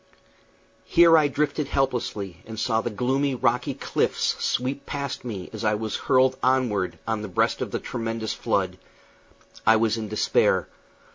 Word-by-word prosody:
Here 170 -1 +6
I 155 -2 +5
drifted 150 +1 -1
helplessly, 120 - -2
and 110 -1 -7
saw 110 0 +1
the 120 - -3
gloomy, 130 +5 0
rocky 120 - 0
cliffs - - -1
sweep 130 +3 -1
past 140 -1 -4
me 105 -7 -5
as - - -6
I 105 -1 +2
was 110 0 -3
hurled 130 0 +2
onward 125 -8 +1
on 110 -1 -1
the 105 - -5
breast 90 - 0
of - - -2
the - - -2
tremendous 115 -2 -3
flood. - - -1 0.8
I 115 - +6
was 110 0 +2
in 110 -1 -4
despair. 105 0 +2
115 Hz, 155 wpm, -25 LUFS, 110-135 Hz, 0.8 s, Here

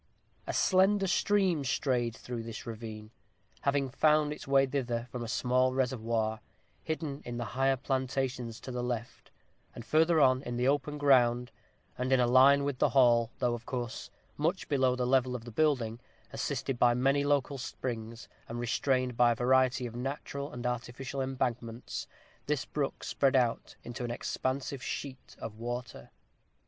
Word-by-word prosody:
A - - -2
slender 195 +1 +3
stream 190 -4 +2
strayed 125 -3 0
through 120 -1 -6
this 115 -1 -7
ravine, 110 -1 -7 0.5
having 140 -2 0
found 150 +2 +3
its 150 - -10
way 135 0 +5
thither 125 -3 -2
from 125 -2 -4
a - - -5
small 130 +2 +1
reservoir, 115 -4 0 0.4
hidden 155 -3 -4
in 120 0 -5
the 120 - -3
higher 135 +1 +2
plantations 130 -3 -2
to 130 - -7
the 125 0 -3
left; 120 -1 -5 0.5
and 120 - -8
further 160 +2 +3
on, 130 -2 +4
in 120 -3 -5
the 125 +1 +1
open 145 +1 0
ground, 125 -4 +3 0.5
and 130 +1 -1
in 130 - +5
a 125 - +4
line 135 +3 +6
with 140 -3 -2
the - - +4
hall, 120 -4 +4
though, 125 -2 +1
of 120 0 -7
course, 120 -3 -4 0.3
much 165 +5 -1
below 130 -3 +2
the 125 -1 -1
level 130 0 +2
of 120 -2 -6
the 120 - -8
building, 120 -4 +1 0.3
assisted 130 -3 -2
by 120 -1 +5
many 135 +3 +2
local 145 -1 +1
springs, 115 -4 -5 0.2
and 120 +1 -4
restrained 125 +1 0
by 120 0 +5
a - - -7
variety 130 +1 +2
of 120 -1 -7
natural 140 +2 -4
and 120 0 -7
artificial 125 +2 -3
embankments, 125 -3 -3 0.4
this 145 -2 0
brook 145 -2 -3
spread 135 -1 +1
out 120 -3 +1
into 120 +1 -6
an 120 - -3
expansive 130 +2 -3
sheet 130 0 -6
of 110 -1 -8
water. 120 +1 -5
130 Hz, 165 wpm, -31 LUFS, 120-140 Hz, 0.5 s, line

